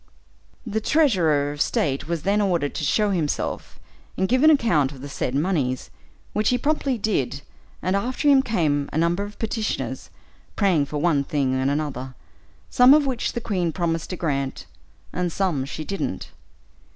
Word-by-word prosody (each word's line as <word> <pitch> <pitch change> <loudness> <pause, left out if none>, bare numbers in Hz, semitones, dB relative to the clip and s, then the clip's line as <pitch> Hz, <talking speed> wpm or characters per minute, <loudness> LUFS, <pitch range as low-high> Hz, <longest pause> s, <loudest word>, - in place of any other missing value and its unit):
The 220 -1 -2
treasurer 175 - +2
of 145 0 -5
state 140 -1 0
was 170 -2 -2
then 205 +2 +2
ordered 170 -8 0
to - - -4
show 210 +7 +2
himself, 160 -6 -2 0.4
and 190 - +1
give 255 +4 +2
an 310 - +7
account 220 - +3
of 135 -3 -11
the 140 - -6
said 135 -2 -3
moneys, 145 -5 -1 0.4
which 210 0 +1
he 250 - +2
promptly 280 -2 0
did; 145 - -1 0.4
and 185 +1 +1
after 250 +8 -1
him 275 -2 +6
came 155 - 0
a - - -3
number 170 +3 +1
of 205 0 -9
petitioners, 210 - -3 0.5
praying 170 -8 +2
for 150 - -4
one 150 -2 +2
thing 140 -2 0
and 130 +1 +1
another, 135 -3 -3 0.6
some 250 +3 +7
of 300 -1 +3
which 255 -3 -2
the 235 - -3
queen 180 -6 -1
promised 165 -1 -2
to 185 - -3
grant, 140 -6 -2 0.5
and 180 -1 -1
some 165 -8 -1
she 155 +2 -6
didn't. 195 +3 -4
170 Hz, 170 wpm, -23 LUFS, 145-215 Hz, 0.6 s, an